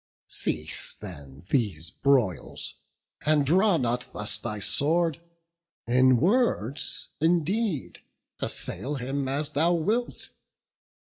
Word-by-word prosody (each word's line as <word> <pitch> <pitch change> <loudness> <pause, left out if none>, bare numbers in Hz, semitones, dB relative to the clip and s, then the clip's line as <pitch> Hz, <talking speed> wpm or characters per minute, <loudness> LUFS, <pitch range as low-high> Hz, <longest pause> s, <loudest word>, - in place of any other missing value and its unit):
Cease, - - 0
then, 70 -7 -10
these 95 - +1
broils, 125 -9 0 0.5
and 150 -1 +3
draw 185 +5 +4
not 125 -2 -1
thus 105 0 0
thy 105 -3 -4
sword; 160 +11 +2 0.6
In 130 +2 +5
words, 165 - +1
indeed, 175 - 0 0.4
assail 145 +3 -3
him 135 +1 -2
as 145 +2 -1
thou 165 +5 +3
wilt. 220 +9 -1
140 Hz, 100 wpm, -27 LUFS, 115-165 Hz, 0.6 s, In